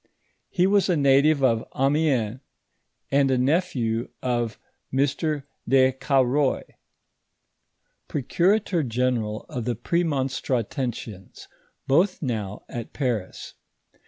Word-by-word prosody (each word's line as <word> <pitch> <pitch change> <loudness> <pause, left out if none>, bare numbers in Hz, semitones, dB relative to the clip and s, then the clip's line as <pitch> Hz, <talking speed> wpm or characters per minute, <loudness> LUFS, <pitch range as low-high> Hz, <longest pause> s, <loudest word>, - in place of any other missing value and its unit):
lie 180 - +5
wns 200 0 +3
a 175 - +3
native 140 +1 +4
of 115 -3 +3 0.2
Amiens, 135 -5 +1 0.7
and 140 0 +3
a 130 - +2
nephew 125 -5 0
of 120 -3 -1 0.3
Mr. 145 +2 0 0.3
de 130 0 +5
Cauroy, 135 +1 +1 1.5
procura 175 - +2
tor 175 -4 0
general 120 -4 -1
of 120 -3 -5
the 120 -1 -1
Premonstratensians, 130 - -2 0.4
both 175 +8 +2
now 105 -6 -3
at 120 -2 -7
Paris. 120 -9 -3
130 Hz, 100 wpm, -24 LUFS, 120-150 Hz, 1.5 s, lie